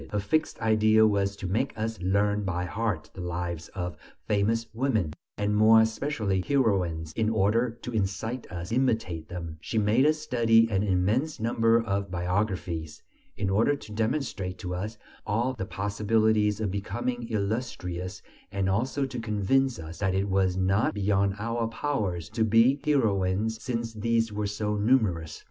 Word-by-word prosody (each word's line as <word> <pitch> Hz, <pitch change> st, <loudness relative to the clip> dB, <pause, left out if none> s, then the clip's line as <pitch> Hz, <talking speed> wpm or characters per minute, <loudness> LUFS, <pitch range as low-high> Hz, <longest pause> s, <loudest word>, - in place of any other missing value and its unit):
Her 105 Hz, -, -1 dB
fixed 155 Hz, +11 st, 0 dB
idea 110 Hz, 0 st, +4 dB
was 100 Hz, -2 st, +1 dB
to 100 Hz, -, -7 dB
make 95 Hz, +5 st, -1 dB
us 110 Hz, -2 st, -3 dB
learn 100 Hz, +3 st, +1 dB
by 90 Hz, -2 st, -2 dB
heart 90 Hz, -6 st, -2 dB
the 95 Hz, -, -8 dB
lives 85 Hz, -1 st, -4 dB
of 90 Hz, -4 st, -4 dB, 0.3 s
famous 110 Hz, +3 st, +1 dB
women, 110 Hz, -, 0 dB, 0.2 s
and 105 Hz, 0 st, 0 dB
more 110 Hz, +1 st, +7 dB
especially 110 Hz, -4 st, 0 dB
"heroines," 90 Hz, -, 0 dB
in 110 Hz, -1 st, +1 dB
order 110 Hz, +3 st, +2 dB
to 125 Hz, -, -5 dB
incite 110 Hz, +4 st, -2 dB
us 85 Hz, 0 st, -5 dB
to 115 Hz, -, -1 dB
imitate 110 Hz, -11 st, 0 dB
them; 85 Hz, -2 st, -6 dB
she 110 Hz, -, -3 dB
made 110 Hz, +6 st, +4 dB
us 155 Hz, 0 st, +3 dB
study 115 Hz, -6 st, +3 dB
an 95 Hz, -1 st, +2 dB
immense 105 Hz, -, +1 dB
number 115 Hz, 0 st, +3 dB
of 100 Hz, -3 st, -2 dB
biographies; 90 Hz, -3 st, -2 dB, 0.3 s
in 100 Hz, -, -1 dB
order 115 Hz, +8 st, +3 dB
to 125 Hz, -6 st, -11 dB
demonstrate 110 Hz, -5 st, -2 dB
to 90 Hz, -2 st, -5 dB
us 105 Hz, +5 st, -4 dB, 0.3 s
all 120 Hz, +5 st, +1 dB
the 110 Hz, -7 st, -4 dB
possibilities 105 Hz, +1 st, +1 dB
of 105 Hz, -4 st, -1 dB
becoming 120 Hz, +5 st, -3 dB
illustrious 100 Hz, -4 st, -3 dB, 0.3 s
and 100 Hz, -1 st, -1 dB
also 125 Hz, +8 st, 0 dB
to 130 Hz, -2 st, -5 dB
convince 115 Hz, +4 st, +1 dB
us 80 Hz, +1 st, -8 dB
that 95 Hz, -1 st, 0 dB
it 95 Hz, +1 st, +1 dB
was 95 Hz, -1 st, +2 dB
not 95 Hz, +3 st, +2 dB
beyond 100 Hz, -1 st, +1 dB
our 115 Hz, +2 st, -1 dB
powers 110 Hz, -, -2 dB
to 115 Hz, -, 0 dB
be 115 Hz, +6 st, +4 dB
heroines, 110 Hz, -, +1 dB
since 115 Hz, -2 st, -3 dB
these 115 Hz, 0 st, 0 dB
were 105 Hz, 0 st, -1 dB
so 105 Hz, +1 st, -2 dB
numerous. 105 Hz, -8 st, +1 dB
105 Hz, 160 wpm, -27 LUFS, 95-115 Hz, 0.3 s, more